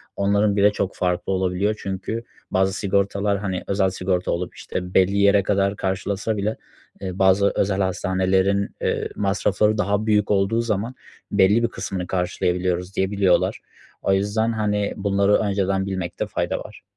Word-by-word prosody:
onların 100 +1 +2
bile 100 0 +5
çok 100 -2 -3
farklı 90 +1 -1
olabiliyor. 95 +3 0
Çünkü 100 +4 -4 0.3
bazı 95 0 +2
sigortalar, 100 +1 0
hani, 95 -2 -3
özel 95 -1 +2
sigorta 90 -1 -1
olup, 90 +1 -3
işte, 90 0 -5
belli 95 +2 +4
yere 100 0 +4
kadar 100 0 +1
karşılasa 100 +3 -2
bile, 105 +2 -1 0.4
eee, 95 -1 -5
bazı 95 +1 +4
özel 100 0 +1
hastanelerin, 95 +1 +1
eee, - - -1
masrafları 105 +1 +1
daha 105 +1 0
büyük 105 -1 +2
olduğu 100 +4 +2
zaman 115 +2 -2 0.4
"Belli 100 +3 +4
bir 115 - +3
kısmını 95 -3 -5
karşılayabiliyoruz." 90 0 -1
diyebiliyorlar. 95 0 +2 0.4
O 95 - +2
yüzden, 105 +4 +1
hani, 105 -2 0
bunları 100 0 +2
önceden 95 -2 0
bilmekte 95 -3 -3
fayda - - -2
var. - - -11
100 Hz, 145 wpm, -22 LUFS, 95-100 Hz, 0.4 s, bile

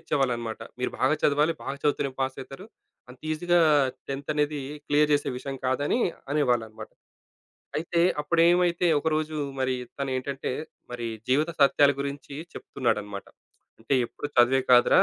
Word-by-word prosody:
ఇచ్చేవాళ్ళన్నమాట. 120 -5 -1 0.2
"మీరు 125 - -1
బాగా 135 +4 +3
చదవాలి, 150 +3 +3
బాగా 135 +1 -4
చదువుతూనే 145 -1 +1
పాసయితారు. 135 +5 -4 0.4
అంత 125 - -13
ఈజీగా 175 +2 +2 0.5
10థ్ 140 0 -5
అనేది 150 -1 0 0.3
క్లియర్ 150 +1 +3
చేసే 145 - +1
విషయం 135 +1 -5
కాదు" 130 +2 0
అని 245 - +1 0.3
అనేవాళ్ళన్నమాట. 120 -7 -1 0.9
అయితే 170 +2 0 0.2
అప్పుడేమైదంతే 170 +2 +3
ఒకరోజు 155 0 -1 0.2
మరి 130 0 +1 0.2
తనేంటంటే, 135 0 -3 0.4
మరి 120 -1 -4 0.2
జీవిత 150 +5 +3
సత్యాల 140 0 +5
గురించి 140 0 -5 0.2
చెప్తున్నాడన్నమాట. 105 -6 -3 0.5
"అంటే 115 +5 -1
ఎప్పుడు 145 - -6
చదువే 125 +2 +5
కాదురా, 125 -1 +6
140 Hz, 125 wpm, -26 LUFS, 130-150 Hz, 0.9 s, కాదురా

